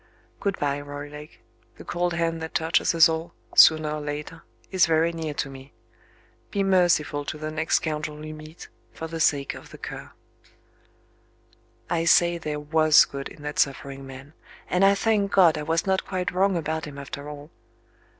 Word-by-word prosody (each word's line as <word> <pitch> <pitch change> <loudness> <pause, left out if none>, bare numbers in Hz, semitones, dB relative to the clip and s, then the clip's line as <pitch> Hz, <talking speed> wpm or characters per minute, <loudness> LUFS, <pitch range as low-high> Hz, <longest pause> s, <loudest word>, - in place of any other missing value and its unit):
Good 200 -1 -1
bye, 145 0 -1
Roylake. 145 +1 -9 0.4
The - - -11
cold 175 0 -1
hand 165 -1 -1
that 160 - -7
touches 160 +1 +2
us 165 0 +8
all, 165 +1 -4 0.2
sooner 155 -1 +7
or 150 0 -3
later, 150 +2 -6 0.3
is 185 -3 +4
very 165 +1 +2
near 160 -3 -5
to - - -2
me. 135 -1 -12 0.8
Be 200 - -1
merciful 175 -6 +2
to 155 - -5
the 155 0 -5
next 160 +1 0
scoundrel 150 -1 -2
you 155 - -7
meet, 155 +2 -11 0.2
for 160 - -7
the 165 0 -6
sake 140 -3 +1
of - - -12
The - - -12
Cur." - - -8 1.8
I 165 -1 0
say 170 0 +4
there 150 -2 -4
was 155 0 +5
good 140 -1 -7
in 150 - -14
that 150 0 -4
suffering 135 -1 -1
man; 135 +2 -11 0.3
and 180 +2 +1
I 200 0 +6
thank 205 -1 +1
God 175 -5 +5
I - - -3
was 165 +2 0
not 190 -1 +1
quite 185 -2 -2
wrong 190 0 +2
about 160 0 -3
him 145 -1 -9
after 140 +1 -7
all. 150 +1 -10
155 Hz, 180 wpm, -25 LUFS, 150-170 Hz, 1.8 s, us